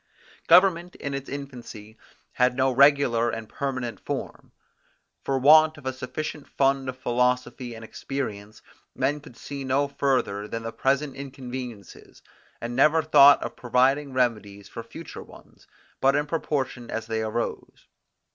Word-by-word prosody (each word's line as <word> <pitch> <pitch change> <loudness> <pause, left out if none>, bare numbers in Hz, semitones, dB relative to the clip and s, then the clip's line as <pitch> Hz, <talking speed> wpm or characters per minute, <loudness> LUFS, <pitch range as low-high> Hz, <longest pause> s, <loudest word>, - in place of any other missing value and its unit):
Government 180 0 +5
in 140 - -5
its 140 0 -5
infancy 120 -6 -8 0.4
had 125 0 +2
no 130 0 +3
regular 130 -3 +4
and 115 -1 -5
permanent 125 -5 -4
form. - - -6 0.7
For 135 - 0
want 155 +3 +6
of 140 - -14
a 130 - -2
sufficient 140 +3 -6
fund 135 -1 +1
of 130 - -6
philosophy 125 -1 -1
and 110 0 -9
experience, 110 -5 -6 0.3
men 145 +2 0
could 125 -4 -15
see 140 -1 -7
no 135 +2 +1
further 130 -8 -1
than 115 +1 -5
the 115 0 -5
present 135 +3 0
inconveniences, 130 -6 -9 0.4
and 120 +1 -5
never 155 +4 +4
thought 145 -2 +7
of - - -6
providing 130 +4 +1
remedies 105 -6 -1
for - - -8
future - - -10
ones, - - -17 0.3
but 135 +1 +3
in 145 0 +1
proportion 135 -6 -3
as 115 0 -4
they 110 0 -2
arose. 110 +2 -4
130 Hz, 145 wpm, -25 LUFS, 120-140 Hz, 0.7 s, thought